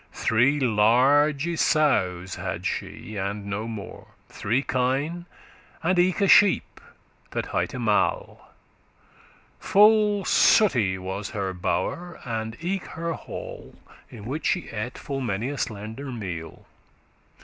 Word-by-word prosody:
*maintained - - -14
Three 125 +6 +3
large 140 +7 +3
sowes 95 - +1
had - - -5
she, 110 - -5
and 100 +1 -3
no 100 +2 -4
mo'; 110 -4 -8 0.2
Three 120 +7 -1
kine, 140 +8 -1 0.6
and 180 +2 +2
eke 185 +3 +2
a 200 - +4
sheep 205 0 +4 0.5
that - - -3
highte - - -2
Mall. - - -1 1.1
Full 210 -1 +4
sooty 115 - +4
was 95 +2 -5
her 95 -1 -2
bow'r,* 165 - -3
and 110 -1 -4
eke 185 +2 -2
her 165 0 -2
hall, - - -9
*chamber - - -22
In 105 -3 -11
which 140 +7 -3
she 180 - -1
ate 115 +3 -5
full 135 -1 -5
many 115 0 -2
a 145 - -5
slender 110 +5 -5
meal. 90 -9 -7
125 Hz, 125 wpm, -25 LUFS, 105-165 Hz, 1.1 s, a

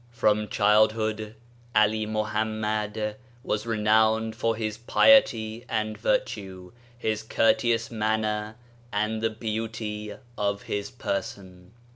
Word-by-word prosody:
From 105 -3 +1
childhood 110 +1 +2 0.4
Ali 105 0 +3
Mohammad 110 0 -2 0.3
was 105 +2 -2
renowned 110 0 +2
for 115 0 0
his 110 -1 -3
piety 115 - +4
and 110 -1 -1
virtue, 95 - -2 0.3
his 110 -3 -1
courteous 115 +1 +1
manner, 110 -1 -1 0.4
and 110 +2 -1
the 115 - +2
beauty 110 -1 -4 0.2
of 100 0 -1
his 100 0 -3
person. 95 -1 -5
110 Hz, 100 wpm, -26 LUFS, 105-110 Hz, 0.4 s, piety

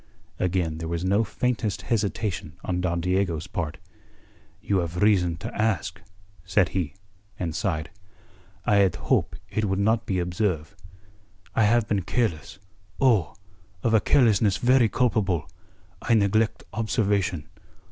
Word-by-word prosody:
Again 90 -3 0
there 80 - -4
was 85 +1 -2
no 100 +4 +3
faintest 115 -1 -2
hesitation 105 -7 -2
on 90 -1 -1
Don 85 -1 0
Diego's 90 -3 0
part. 80 -4 -4 0.8
"You 100 -2 0
have 85 +2 -2
reason 90 -5 +3
to - - -6
ask," 110 -9 -1 0.4
said 95 -6 +2
he, 85 -7 -2 0.4
and 85 -3 -3
sighed. 85 -7 -2 0.7
"I 105 - +4
had 95 -3 +4
hope' - - 0 0.2
it 110 - 0
would 95 -1 0
not 110 +3 +1
be 95 - 0
observe'. 90 -1 -1 0.8
I 110 - +3
have 115 +1 +3
been 100 -3 +1
careless 100 -3 -2 0.4
oh, 115 - +3 0.5
of 115 - +2
a 110 - +5
carelessness 110 -5 +3
very 125 -2 +4
culpable. 100 -9 +1 0.5
I 115 - +2
neglect 110 +1 +2
observation. 100 - 0
100 Hz, 135 wpm, -25 LUFS, 85-110 Hz, 0.8 s, a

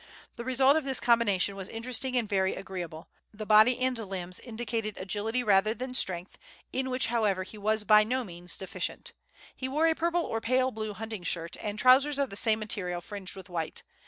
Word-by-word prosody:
The 235 - -6
result 260 +2 +4
of 315 - 0
this 270 -1 0
combination 205 -5 +2
was 190 -1 -6
interesting 250 +2 -2
and 235 -3 0
very 190 -2 +1
agreeable. 175 -4 -7 0.2
The 215 0 -7
body 215 +4 +6
and 255 0 +1
limbs 190 -5 -4
indicated 225 -2 -4
agility 210 +6 -2
rather 210 0 +3
than 255 +2 -5
strength, 185 -7 +1 0.3
in 260 0 -1
which, 255 0 +1
however, 205 -5 +1
he 210 +3 -11
was 215 +1 0
by 210 +1 +6
no 255 +4 -1
means 175 -3 -5
deficient. 190 - -5 0.4
He 260 - -4
wore 305 +4 +1
a 325 - +4
purple 340 +1 0
or 225 -6 -3
pale 255 +2 +1
blue 215 -2 -5
hunting 220 -1 -6
shirt, 170 -1 -2
and 210 -1 -4
trousers 270 +5 +5
of 280 -5 0
the - - -7
same 220 +1 +2
material 200 -5 -1
fringed 190 +1 -5
with 190 +1 -10
white. 170 -3 -4
215 Hz, 195 wpm, -29 LUFS, 195-255 Hz, 0.4 s, body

